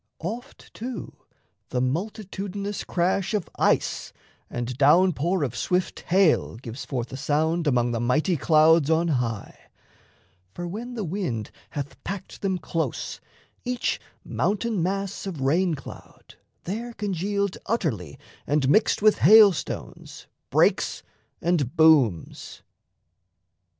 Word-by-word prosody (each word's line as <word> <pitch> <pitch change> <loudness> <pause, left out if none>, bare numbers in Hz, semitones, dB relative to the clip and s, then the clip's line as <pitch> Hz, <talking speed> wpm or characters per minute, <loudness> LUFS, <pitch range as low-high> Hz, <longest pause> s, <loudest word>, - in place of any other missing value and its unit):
Oft, 235 - -7
too, 245 +1 -6 0.6
the 125 - -1
multitudinous 200 - -3
crash 185 +4 0
of 200 -6 -2
ice - - +1 0.4
And 120 +1 -4
down 170 +7 +5
pour 170 +5 0
of 125 -3 -2
swift 180 +7 -1
hail 185 - +3
gives 120 +2 -8
forth 125 -2 -4
a - - -4
sound 160 +4 0
Among 120 -3 +2
the 115 - -1
mighty 150 - +1
clouds 155 0 +4
on 165 +1 +2
high; 115 -7 -2 1.0
for 175 - -4
when 235 +7 -6
The 220 - -3
wind 160 - -3 0.3
hath 140 -2 -6
packed 195 0 -6
them 190 -2 0
close, 165 -1 -3 0.4
each 250 -1 -1 0.2
mountain 210 -1 -1
mass 195 +2 -2
Of 175 -6 -5
rain 165 +5 +2
cloud, 135 - -12 0.3
there 230 +6 -4
congealed 200 -1 -2
utterly 130 - -2 0.3
And 145 -2 +2
mixed 210 +4 +3
with 215 -1 +5
hail 215 -2 +8
stones, 155 - -7 0.2
breaks - - +2 0.4
and 165 -5 +1
booms... 145 - +3
170 Hz, 120 wpm, -25 LUFS, 135-200 Hz, 1.0 s, hail